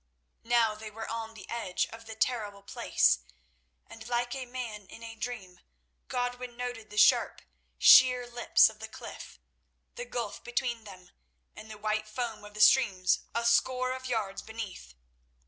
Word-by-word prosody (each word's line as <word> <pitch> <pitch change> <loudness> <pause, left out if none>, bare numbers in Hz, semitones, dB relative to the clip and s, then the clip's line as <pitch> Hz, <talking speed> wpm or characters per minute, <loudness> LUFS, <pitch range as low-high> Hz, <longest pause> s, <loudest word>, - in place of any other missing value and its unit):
Now 230 -2 +3
they 215 0 -9
were 220 +1 -7
on 225 0 -5
the - - -11
edge 225 -6 -1
of 225 0 -11
the 225 - -7
terrible 215 -4 -2
place, 130 - +2 0.7
and, 225 0 -12
like 240 0 -1
a 265 -2 -5
man 235 -5 -6
in 230 - -12
a 230 0 -7
dream, 215 -5 -6 0.5
Godwin 245 -1 -3
noted 245 -3 -5
the 210 - -10
sharp, - - +4 0.3
sheer 250 -1 +7
lips 240 0 +4
of - - -8
the - - -6
cliff, - - -10 0.6
the - - -6
gulf 235 - -5
between 240 -2 -2
them, 185 -3 -13 0.4
and 215 - -11
the 215 - -9
white 215 0 -2
foam 220 -1 -4
of 210 0 -12
the 210 - -2
stream 210 -5 +5 0.3
a 235 0 0
score 255 +2 +2
of 260 0 -7
yards 215 -5 -2
beneath. 205 - -8
225 Hz, 165 wpm, -30 LUFS, 215-245 Hz, 0.7 s, sheer